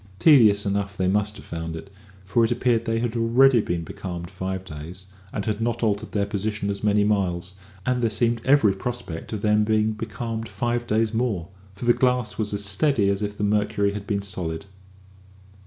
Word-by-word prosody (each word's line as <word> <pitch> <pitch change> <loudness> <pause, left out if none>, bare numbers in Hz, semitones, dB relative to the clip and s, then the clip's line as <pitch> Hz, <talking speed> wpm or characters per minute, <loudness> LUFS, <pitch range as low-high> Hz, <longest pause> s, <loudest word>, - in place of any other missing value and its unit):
Tedious 110 - +6
enough 100 0 -2
they 95 - +1
must 105 +2 +1
have - - -12
found 80 0 -5
it, 90 +5 -9 0.3
for 105 +5 +2
it 115 - +2
appeared 120 -1 +1
that 115 - -1
they 115 - +1
had 120 0 -2
already 120 +2 +5
been 85 -4 -2
becalmed 85 0 -7
five 95 0 -4
days, 85 +4 -9 0.3
and 100 - -3
had 110 0 -2
not 120 +1 -1
altered 105 -2 0
their 100 -2 0
position 100 0 -2
as 100 0 -5
many 105 -1 +3
miles; 95 -4 0 0.3
and 125 -1 +1
there 115 - +2
seemed 115 +2 +1
every 130 -7 +4
prospect 95 -6 -5
of 110 -2 -4
their 105 0 +3
being 110 0 +2
becalmed 115 +1 -5
five 120 0 -2
days 110 +1 +1
more, 110 -7 -1 0.3
for 110 - -6
the 120 - +6
glass 125 -4 0
was 105 -1 -1
as 100 0 -1
steady 100 0 +2
as 100 +1 -2
if 105 0 -3
the - - -3
mercury 105 -1 +1
had 105 0 -6
been 100 -1 -1
solid. 90 -3 -4
105 Hz, 200 wpm, -24 LUFS, 100-115 Hz, 0.3 s, Tedious